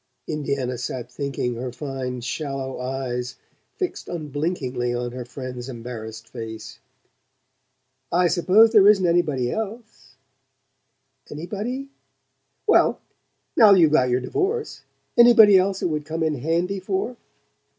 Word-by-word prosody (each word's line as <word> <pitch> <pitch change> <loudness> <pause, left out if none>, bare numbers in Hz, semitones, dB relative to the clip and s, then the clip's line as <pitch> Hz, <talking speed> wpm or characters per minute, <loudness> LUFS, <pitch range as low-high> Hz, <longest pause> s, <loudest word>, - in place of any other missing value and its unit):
Indiana 140 -5 -2
sat 125 0 -5
thinking, 135 -2 -3
her 125 +2 -5
fine 130 -1 -5
shallow 135 +1 -4
eyes 125 -1 -4 0.4
fixed 370 -4 -4
unblinkingly 145 -6 -3
on 120 0 -3
her 125 0 -6
friend's 125 0 -7
embarrassed 115 -2 -8
face. 110 -2 -8 1.3
"I 175 +1 +3
suppose 190 +6 +5
there 205 -3 +6
isn't 200 -3 +5
anybody 150 -8 +1
else 215 - -7 0.5
?" 135 0 -36
"Anybody 215 - -5 0.4
?" - - -49
"Well - - +4 0.6
now 210 -3 +7
you've 165 -5 +5
got 130 -5 +3
your 125 +1 +1
divorce: 425 - -2 0.4
anybody 230 -4 +8
else 190 +1 +2
it - - +1
would 150 -1 -2
come 160 +1 -3
in 160 -1 +1
handy 170 +7 -1
for?" 195 +6 -2
140 Hz, 125 wpm, -23 LUFS, 125-190 Hz, 1.3 s, anybody